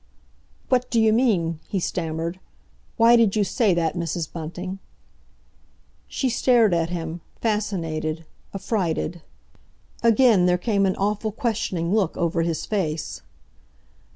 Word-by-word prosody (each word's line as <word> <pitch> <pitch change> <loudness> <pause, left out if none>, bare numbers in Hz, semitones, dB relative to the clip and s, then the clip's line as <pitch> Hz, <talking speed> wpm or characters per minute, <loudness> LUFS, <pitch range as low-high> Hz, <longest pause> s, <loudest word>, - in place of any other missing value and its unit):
"What 250 -1 +1
d'you 220 -2 +3
mean?" 185 -10 +1
he 195 - -1
stammered. 165 0 -3 0.6
"Why 230 +1 +6
did 225 -4 +3
you 210 - +3
say 200 0 +1
that, 165 -2 0
Mrs. 170 -2 -3
Bunting?" 175 +4 -6 1.3
She 265 - -1
stared 235 -4 +3
at 165 -1 +1
him, 165 -1 -4 0.2
fascinated, 165 -7 -2 0.3
affrighted. 180 -4 -2 0.8
Again 230 -5 +5
there 180 0 +3
came 200 +1 +1
an 190 - 0
awful 210 +2 -1
questioning 205 -7 -2
look 205 -6 +1
over 170 0 0
his 165 -1 -2
face. 165 -7 -3
185 Hz, 120 wpm, -23 LUFS, 165-220 Hz, 1.3 s, Why